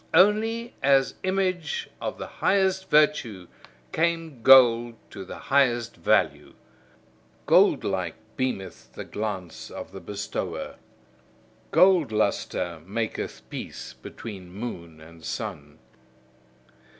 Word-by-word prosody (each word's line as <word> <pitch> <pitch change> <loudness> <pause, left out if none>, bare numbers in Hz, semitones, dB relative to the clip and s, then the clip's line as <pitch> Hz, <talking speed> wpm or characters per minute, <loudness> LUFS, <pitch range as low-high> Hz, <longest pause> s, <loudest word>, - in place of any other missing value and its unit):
Only 220 +5 +3
as 135 -1 +4
image 185 -4 -1
of - - -3
the - - -5
highest 190 -1 +1
virtue 150 - +2 0.4
came 165 -5 -1
gold 120 -2 +7 0.2
to 95 - -7
the 95 - -9
highest 120 -4 +1
value. - - +1 0.9
Goldlike, - - +3 0.2
beameth 125 -8 -4
the - - -6
glance 100 -5 -5
of - - -8
the 95 - -8
bestower. 100 +4 -5 0.9
Gold 180 -9 +5
lustre 90 -5 -1
maketh 110 +5 -4
peace 60 - -7
between 90 - -9
moon 90 -6 -7
and 80 +1 -15
sun. 75 -1 -6
120 Hz, 100 wpm, -26 LUFS, -, 0.9 s, gold